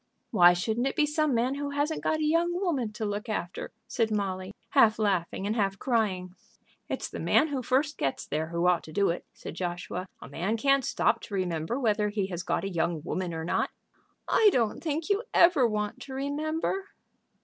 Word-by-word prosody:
"Why 175 -5 +7
shouldn't 220 +8 0
it - - -2
be 300 - +3
some 300 -2 +1
man 245 +3 +1
who 285 0 -3
hasn't 290 +2 -1
got 315 - +1
a - - 0
young 340 +3 +2
woman 285 - 0
to 215 +1 -3
look 205 +3 -3
after?" 180 -4 -4 0.2
said 225 -2 0
Molly, 190 -3 -2 0.2
half 220 -1 +5
laughing 195 -3 0
and 210 +2 0
half 195 -3 0
crying. 195 -8 0 0.6
"It's - - -2
the - - -7
man 315 - +3
who 275 -3 -2
first 275 +4 0
gets 135 - -1
there 155 +2 -2
who 170 +1 -1
ought 180 -1 +3
to 155 - -10
do 195 +3 +2
it," 170 - -6
said - - -8
Joshua. 180 0 -4
"A - - -10
man 200 +7 -2
can't 275 +3 +3
stop - - +1
to 205 - -6
remember 180 - -1
whether 210 -4 +1
he 205 -2 -1
has 175 -2 -3
got 175 - -1
a 195 - -2
young 165 -2 -1
woman 180 +1 -2
or 160 -1 -4
not." - - 0 0.6
"I 435 - +5
don't 230 - 0
think 315 0 -2
you 405 +1 +2
ever 340 -8 +6
want 210 -1 -2
to 265 - -8
remember." 310 +7 -2
220 Hz, 205 wpm, -28 LUFS, 185-285 Hz, 0.6 s, Why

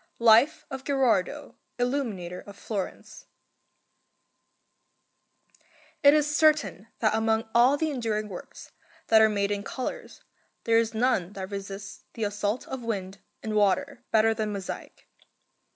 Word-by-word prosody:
GHERARDO 235 +7 +4
GHERARDO 270 0 0 0.2
ILLUMINATOR 230 -9 -2
OF 200 - -10
FLORENCE 200 -3 -6 2.7
It 285 +1 +7
is 300 0 +1
certain 300 -9 +2
that 215 -2 +3
among 220 0 +1
all 250 +4 +5
the 315 +1 -1
enduring 220 -5 -2
works 190 -4 -10 0.4
that 220 -1 +7
are 220 - +6
made 200 -1 0
in 205 0 -1
colours 255 +5 -6 0.4
there 230 0 +4
is 225 -1 -1
none 220 -6 +1
that 190 0 -7
resists 200 0 -7
the 225 - -3
assault 205 +2 -2
of 265 -1 -5
wind 195 -4 -4 0.2
and 220 - -3
water 200 -3 +1
better 225 0 +4
than 215 -1 -2
mosaic. 200 -2 -7
220 Hz, 125 wpm, -27 LUFS, 200-250 Hz, 2.7 s, It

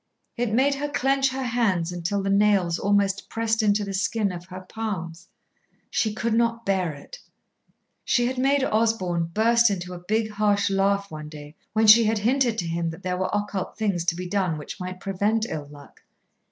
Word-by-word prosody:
It 240 -2 -1
made 265 +5 +3
her 290 +1 -3
clench 270 -1 +1
her 265 0 -4
hands 215 -9 0
until 175 +3 -2
the 195 - 0
nails 200 -4 +3
almost 200 -1 +1
pressed 225 0 0
into 210 -1 +2
the 200 -1 -5
skin 200 +1 0
of 175 -1 -8
her 185 0 -9
palms. 185 -5 -6 0.6
She 220 - +1
could 220 +2 -2
not 230 0 +1
bear 190 -4 0
it. - - -12 0.8
She 240 - +2
had 255 +1 -2
made 275 +1 +2
Osborn 215 -8 +1
burst 230 +3 +4
into 180 -2 -4
a 175 - -7
big, 215 +4 -1
harsh 205 -1 +1
laugh 200 0 +1
one 155 -1 -7
day 150 -1 -11 0.2
when 220 +1 +3
she 220 +2 +8
had 220 +1 +1
hinted 240 +2 +1
to 175 - -2
him 165 0 -1
that 165 +3 -9
there 180 0 -1
were 185 - -1
occult 205 -2 -3
things 200 -6 0
to 175 -1 +1
be 180 +1 -5
done 185 -4 0
which 150 +6 -8
might 185 0 -6
prevent 205 +3 0
ill 150 -9 -5
luck. 145 -1 -15
200 Hz, 195 wpm, -24 LUFS, 180-225 Hz, 0.8 s, she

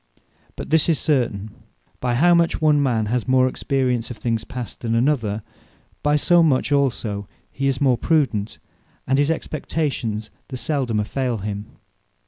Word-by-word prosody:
But - - -7
this 160 +1 +3
is 160 - +3
certain; 115 -9 0 0.5
by 125 -1 0
how 175 +7 +5
much 170 -1 +2
one 150 -2 +4
man 120 -6 +1
has 120 +3 -1
more 130 0 +4
experience 130 -3 -1
of 120 - -7
things 115 -2 -1
past, 125 -3 -7
than 115 -1 -1
another; 115 -5 +1 0.6
by 150 0 +2
so 175 +3 +4
much 145 -3 +2
also 115 -8 0 0.2
he 135 0 -2
is 135 -2 0
more 130 -4 +3
Prudent, 130 -10 0 0.5
and 135 +1 +2
his 145 +1 +2
expectations 140 -9 -2 0.2
the 130 - -6
seldomer 120 -7 -1
faile 125 -1 -2
him. 105 0 -4
130 Hz, 155 wpm, -22 LUFS, 115-145 Hz, 0.6 s, how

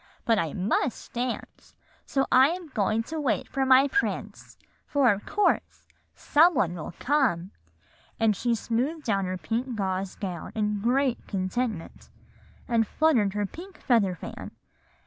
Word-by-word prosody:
But 225 -2 +3
I 165 -3 -2
must 195 +5 -1
dance; 245 0 -5 0.3
so 270 -1 +1
I 260 +1 +7
am 350 -1 -5
going 220 -2 0
to 315 +6 -5
wait 225 -9 0
for 270 -1 -1
my 265 +1 +6
prince, 405 +9 -3 0.3
for 270 -6 +4
of 200 - -8
course 415 - 0 0.3
some 330 +4 +4
one 175 -4 +1
will 170 0 -7
come;' 245 - +1 0.7
and 220 -2 +3
she 235 +3 0
smoothed 255 +9 -2
down 200 -6 0
her 185 0 -3
pink 235 +6 -3
gauze 190 -2 -2
gown 180 -5 -6
in 210 -1 -1
great 255 +2 +1
contentment, 195 0 -3 0.6
and 230 -3 +2
fluttered 235 -11 +2
her 205 0 0
pink 355 - -10
feather 210 -8 +2
fan. - - -8
230 Hz, 145 wpm, -27 LUFS, 195-270 Hz, 0.7 s, I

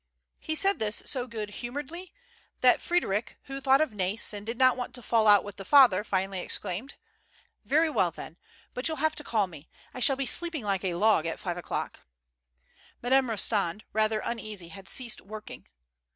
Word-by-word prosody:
He 315 - -4
said 390 +4 +3
this 215 -1 0
so 255 -3 -1
good 215 -3 -6
humoredly 290 +9 -6 0.5
that - - +5
Frederic, 230 - -1
who 275 0 -7
thought 270 +1 +4
of 310 - +1
Nais, 200 +2 +1
and 205 -1 -6
did 230 +2 -5
not 255 -1 +5
want 250 0 -5
to 245 - -5
fall 220 0 +2
out 205 -2 +7
with 205 -2 -9
the 195 - -7
father, 240 -4 +6
finally 190 -2 -2
exclaimed: 190 +8 -3 0.7
"Very 315 +4 +3
well, 190 - +2
then. 165 0 -10 0.4
But 250 - -1
you'll 315 -1 -2
have 315 +2 +1
to 300 - -3
call 220 -7 +1
me. 160 -4 -13 0.2
I - - -7
shall 270 +2 +4
be 270 0 -3
sleeping 335 0 0
like 195 -2 -1
a 180 -3 -1
log 200 -4 +3
at 165 - -4
five 175 -4 -4
o'clock." 175 - -4 1.0
Madame 260 0 +3
Rostand, 210 -3 0
rather 215 0 +1
uneasy, 215 -7 -5
had 195 +2 -12
ceased 245 -3 -1
working. 215 +2 -10
220 Hz, 185 wpm, -28 LUFS, 195-270 Hz, 1.0 s, out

